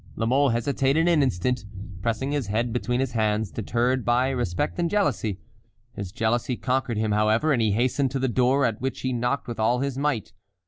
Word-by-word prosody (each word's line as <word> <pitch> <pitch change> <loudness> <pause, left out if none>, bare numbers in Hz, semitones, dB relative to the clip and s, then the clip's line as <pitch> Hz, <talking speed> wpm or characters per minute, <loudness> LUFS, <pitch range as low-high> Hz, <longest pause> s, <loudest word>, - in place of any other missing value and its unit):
La 115 - -1
Mole 135 +4 +3
hesitated 135 +6 +1
an 170 -4 +4
instant, 125 -1 0 0.4
pressing 115 +6 -1
his 145 -7 -1
head 115 +3 -1
between 120 +1 -1
his 135 -2 -1
hands, 110 -2 0
deterred 120 +3 0
by 125 +2 +2
respect 125 - -2
and 170 -1 +1
jealousy. 140 - 0 0.6
His 100 -2 -6
jealousy 115 +3 0
conquered 130 -3 -1
him, 110 0 0
however, 110 +8 +2
and 120 - +1
he 110 -3 +2
hastened 130 +4 +1
to 135 - -3
the 130 0 0
door, 130 +3 +2
at 115 -2 -2
which 135 0 -3
he 130 -1 -1
knocked 125 +3 -1
with 120 -2 -6
all 115 +3 +2
his 135 -1 -2
might. 140 -10 -1
125 Hz, 195 wpm, -25 LUFS, 110-135 Hz, 0.6 s, an